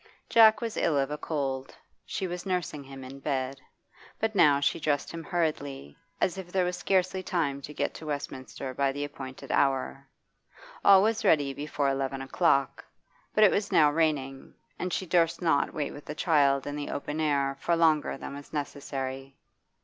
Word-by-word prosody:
Jack 220 +1 +6
was 230 -2 -3
ill 155 -4 +2
of 135 +1 0
a 150 - -2
cold 135 -4 -3 0.3
she 190 - -3
was 175 -1 -4
nursing 180 -6 -2
him 135 0 -10
in 135 +2 -9
bed. 135 -1 -2 0.6
But 220 0 0
now 150 -7 +5
she 140 - +1
dressed 145 -2 -1
him 165 -1 -6
hurriedly, 145 - -2 0.2
as 185 +1 0
if 180 -2 -9
there 185 -1 +2
were 180 - 0
scarcely 185 +1 0
time 155 -8 -1
to 145 - -8
get - - -2
to 160 - -9
Westminster 130 -3 -5
by 135 +1 +1
the 145 +1 -3
appointed 135 -2 -8
hour. 135 0 0 0.8
All 195 -1 +7
was 220 +1 +1
ready 145 -3 +3
before 145 0 -2
eleven 135 0 -1
o'clock, 140 -1 +1 0.5
but 215 - +5
it 205 - +7
was 200 0 -1
now 150 -2 +5
raining, 145 -4 -1 0.2
and 180 - -2
she 190 - -2
durst 165 -2 +2
not 160 -5 +2
wait 150 -3 -3
with 145 - -11
the 150 - -6
child 140 -4 +3
in 145 - -4
the 145 -1 -4
open 150 +2 -4
air 140 -3 +1
for 170 - +1
longer 160 -4 +2
than - - -7
was 140 0 -10
necessary. 135 -2 -5
145 Hz, 180 wpm, -28 LUFS, 135-170 Hz, 0.8 s, All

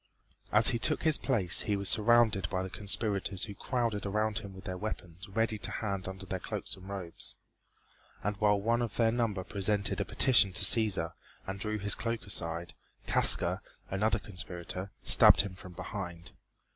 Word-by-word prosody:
As 105 +1 +5
he 120 - -1
took 155 +6 0
his 160 -2 +5
place 100 -10 +3
he 105 - -1
was 100 -1 -2
surrounded 110 -4 +3
by 95 0 -2
the 95 - -7
conspirators 100 -2 -1
who 105 - -5
crowded 115 -1 -3
about 105 +1 -1
him 100 - -10
with 95 0 -12
their 90 - -5
weapons 90 -2 -7
ready 110 +1 -1
to - - -1
hand 100 -4 -4
under 95 +1 -7
their 95 0 -4
cloaks - - -5
and 95 +1 -13
robes, 95 -4 -3 0.9
and 105 +1 -2
while 105 -1 +2
one 115 +4 0
of 115 -4 -4
their 115 -1 +2
number 115 -5 -2
presented 100 +1 0
a - - +1
petition 115 -7 +4
to 95 0 +2
Cæsar, 100 -7 +3 0.3
and 95 0 -6
drew 110 +1 -3
his 105 0 +2
cloak 115 -1 -3
aside, 85 -2 -2 0.3
Casca, - - +5 0.3
another 100 +2 0
conspirator, 90 -1 -7
stabbed - - +6
him 100 -2 -7
from 90 -1 -12
behind. 90 -2 -7
100 Hz, 175 wpm, -30 LUFS, 95-110 Hz, 0.9 s, stabbed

